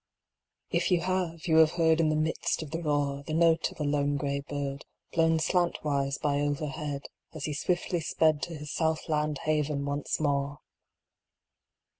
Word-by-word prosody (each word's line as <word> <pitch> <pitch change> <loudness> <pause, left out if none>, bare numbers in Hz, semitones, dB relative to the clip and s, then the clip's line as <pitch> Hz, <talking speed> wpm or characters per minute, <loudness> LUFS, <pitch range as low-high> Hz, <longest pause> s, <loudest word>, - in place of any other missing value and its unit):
If - - +1
you 180 -2 +3
have, 180 -3 -2
you 160 -2 +3
have 160 0 +6
heard 160 -2 +3
In 160 -2 +3
the 155 - +1
midst 155 +1 0
of 150 - -10
the 165 +1 -3
roar, 145 -3 0
The 155 +2 -4
note 165 -1 +4
of - - -15
a - - 0
lone 145 0 +1
gray 140 0 -1
bird, 140 -1 -4 0.3
Blown 165 -1 +3
slantwise 150 -5 0
by 145 -1 +1
overhead 145 0 -2 0.3
As 155 - -4
he 150 - -2
swiftly 175 +3 0
sped 155 -1 +2
To 170 - -4
his 150 -1 -7
south 160 -1 0
land 150 -1 0
haven 150 -2 0
once 140 0 -2
more 140 -1 0
150 Hz, 170 wpm, -29 LUFS, 145-160 Hz, 0.3 s, have